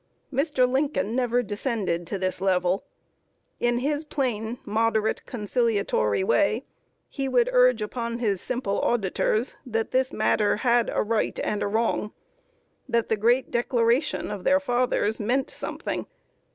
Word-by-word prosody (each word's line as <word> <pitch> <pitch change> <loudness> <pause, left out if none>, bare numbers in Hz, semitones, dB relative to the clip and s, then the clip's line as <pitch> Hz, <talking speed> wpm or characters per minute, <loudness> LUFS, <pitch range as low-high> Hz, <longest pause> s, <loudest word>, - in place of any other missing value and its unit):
Mr. 275 -2 +2
Lincoln 265 -4 0
never 245 -1 +1
descended 205 -6 -2
to 200 - -2
this 185 0 -2
level. 185 -1 +1 0.7
In 240 0 +1
his 290 +4 -1
plain, 245 -6 -2
moderate, 220 0 +1
conciliatory 210 - 0
way, 200 - +2 0.4
he 270 -2 -3
would 245 -2 +3
urge 250 -3 +4
upon 235 +2 -3
his 205 -6 0
simple 240 -6 -2
auditors 220 +2 0
that 225 -4 -2
this 260 +1 +1
matter 215 -1 +2
had 240 -1 +3
a - - +1
Right 220 0 -1
and 210 - -1
a - - 0
Wrong 215 0 0 0.8
that 235 -1 +1
the 220 - +3
great 240 +5 +2
Declaration 235 +2 +1
of 205 -3 -5
their 280 +7 +4
fathers 245 -5 0
meant 245 +5 0
something. - - -4
230 Hz, 140 wpm, -25 LUFS, 210-250 Hz, 0.8 s, urge